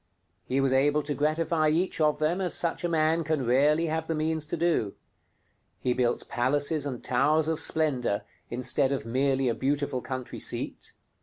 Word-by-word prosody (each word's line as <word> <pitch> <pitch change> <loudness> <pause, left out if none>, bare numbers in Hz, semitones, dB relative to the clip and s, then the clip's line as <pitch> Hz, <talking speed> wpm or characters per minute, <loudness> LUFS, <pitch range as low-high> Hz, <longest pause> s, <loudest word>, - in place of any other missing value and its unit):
He 130 +6 0
was 135 -1 +2
able 145 +3 +3
to 145 - -2
gratify 155 +1 +1
each 165 +2 0
of 150 -1 +3
them 155 +5 0
as 180 - 0
such 170 +1 0
a 175 - 0
man 160 0 +2
can 155 -4 -1
rarely 145 +7 +3
have 160 0 -2
the 165 - -1
means 155 0 -1
to 170 - -3
do. 165 -12 0 0.8
He 125 - 0
built 120 -1 0
palaces 145 +4 0
and 130 -4 -6
towers 150 +5 +2
of 160 -1 -1
splendor 130 -11 0 0.3
instead 130 +2 0
of 135 -5 -2
merely 135 +2 +1
a 120 - +2
beautiful 140 0 -1
country 130 -1 -6
seat. - - -5
145 Hz, 175 wpm, -27 LUFS, 130-160 Hz, 0.8 s, able